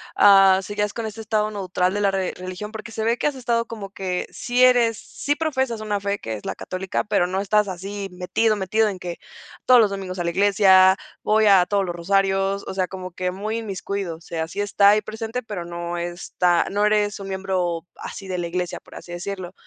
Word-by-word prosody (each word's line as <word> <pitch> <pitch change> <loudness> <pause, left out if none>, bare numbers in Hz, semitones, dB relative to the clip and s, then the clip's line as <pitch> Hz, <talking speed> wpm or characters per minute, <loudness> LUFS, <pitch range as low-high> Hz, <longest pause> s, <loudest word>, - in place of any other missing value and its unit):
ah, 195 -1 +7
seguías 205 +1 -2
con 230 0 -5
ese 220 +1 -6
estado 215 0 0
neutral 185 -2 -1
de 205 - -1
la 200 - +3
re 190 -1 -1
religión? 185 +3 -7
Porque 220 +1 -8
se 220 - -3
ve 235 +1 +2
que - - 0
has 290 - -2
estado 235 -2 0
como 205 -4 -8
que 185 -2 -3
sí 245 +1 -1
eres 235 -3 +4
sí 290 +6 -3
profesas 265 -7 -1
una 210 -1 -1
fe 200 0 -1
que 110 - -5
es 105 - -7
la - - -3
Católica, 185 0 -3
pero 200 -4 +2
no 190 +1 -2
estás 210 +1 +2
así 195 +2 -5
metido 185 +5 +1
metido 210 +3 +1
en 195 - -5
que 175 -1 -6 0.5
todos 255 -1 +7
los 215 -3 +4
domingos 190 -2 -5
a - - 0
la 170 - 0
iglesia, 190 -1 +5 0.3
voy 215 0 +3
a 190 -3 +6
todos 200 -1 +1
los 175 -1 -4
rosarios, 195 +2 +1
o - - -4
sea, 185 -1 0
como 185 -1 -7
que 180 +1 -2
muy 215 +4 -3
inmiscuido, 195 -4 -4
o - - -22
sea, 160 -1 -4
sí 205 - -7
está 205 0 +4
ahí 210 +1 +4
presente, 225 +3 -5
pero 205 -5 -5
no 170 0 -5
está, 175 0 0
no 205 +1 +1
eres 210 -1 +1
un 195 - -7
miembro 185 -3 -2
así 195 - -8
de 185 -1 -3
la 170 - -2
iglesia, 180 0 -3
por - - -16
así 175 - -10
decirlo, 185 0 -5
195 Hz, 225 wpm, -23 LUFS, 185-215 Hz, 0.5 s, ah